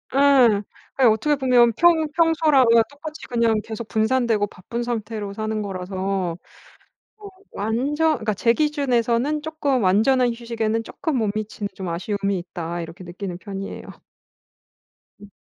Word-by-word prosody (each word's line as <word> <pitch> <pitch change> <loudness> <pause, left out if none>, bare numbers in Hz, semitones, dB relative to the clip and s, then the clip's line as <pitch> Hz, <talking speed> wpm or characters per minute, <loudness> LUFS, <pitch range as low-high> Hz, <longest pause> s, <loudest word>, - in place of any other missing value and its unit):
예. 265 -7 +5 0.4
그게 260 -3 +5
어떻게 225 +8 +2
보면 250 -3 +4
평 330 -2 +4
평소랑 320 -5 +4
어 230 -1 +5
똑같이 305 +2 -9
그냥 230 -3 +1
계속 220 0 -7
분산되고 220 -2 +1
바쁜 220 +6 -6
상태로 220 -3 -4
사는 215 0 -3
거라서 190 -2 -3 0.8
어 420 -1 -11 0.2
완전 285 +9 0
그니까 215 -1 -2
제 230 +4 +3
기준에서는 280 -1 0
'쪼끔 295 -4 -1
완전한 240 +7 +3
휴식에는 230 -1 -2
쪼끔 305 +4 -3
못 215 -4 0
미치는 215 -1 -4
좀 190 -2 -6
아쉬움이 195 +3 -2
있다.' 175 -1 -5
이렇게 165 +2 -9
느끼는 180 0 -6
편이에요. 195 -1 -7 1.4
음. 205 - -13
225 Hz, 305 characters per minute, -22 LUFS, 200-270 Hz, 1.4 s, 예